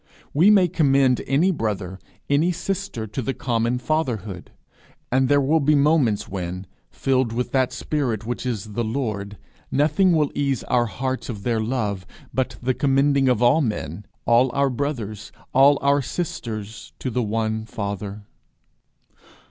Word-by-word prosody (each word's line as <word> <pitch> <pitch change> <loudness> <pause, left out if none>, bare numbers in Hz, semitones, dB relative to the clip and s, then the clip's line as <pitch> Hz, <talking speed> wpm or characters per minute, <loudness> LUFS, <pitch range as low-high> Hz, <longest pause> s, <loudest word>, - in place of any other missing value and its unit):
We 170 +8 +5
may 195 -4 +6
commend 135 -5 +3
any 150 +8 +3
brother, 100 - -3 0.3
any 150 +5 +2
sister, 180 - -3
to 110 +5 -4
the 135 +2 -3
common 120 0 0
fatherhood. 120 - -2 0.6
And 130 +1 +2
there 145 0 +5
will 145 +4 +3
be 150 +1 +3
moments 140 -7 +2
when, 90 0 -5 0.2
filled 130 -3 0
with 120 +2 -2
that 130 -2 +2
spirit 125 -4 -2
which 120 +1 -3
is 110 -4 -4
the 120 - -1
Lord, 110 -4 -3 0.3
nothing 155 +6 +3
will 150 -3 +2
ease 140 -4 -1
our 120 -1 +1
hearts 130 +4 -3
of 105 -4 -6
their 115 0 0
love 110 -5 -2 0.3
but 130 -1 -1
the 130 +1 +2
commending 140 0 +2
of 125 -1 +2
all 130 +7 +5
men, 105 - -3 0.2
all 120 +2 +4
our 140 -1 +2
brothers, 115 -6 -4 0.2
all 140 +2 +6
our 140 0 +3
sisters, 115 - -5
to 130 - -4
the 125 - 0
one 110 0 -2
Father. 100 -1 -5
125 Hz, 150 wpm, -23 LUFS, 110-140 Hz, 0.6 s, may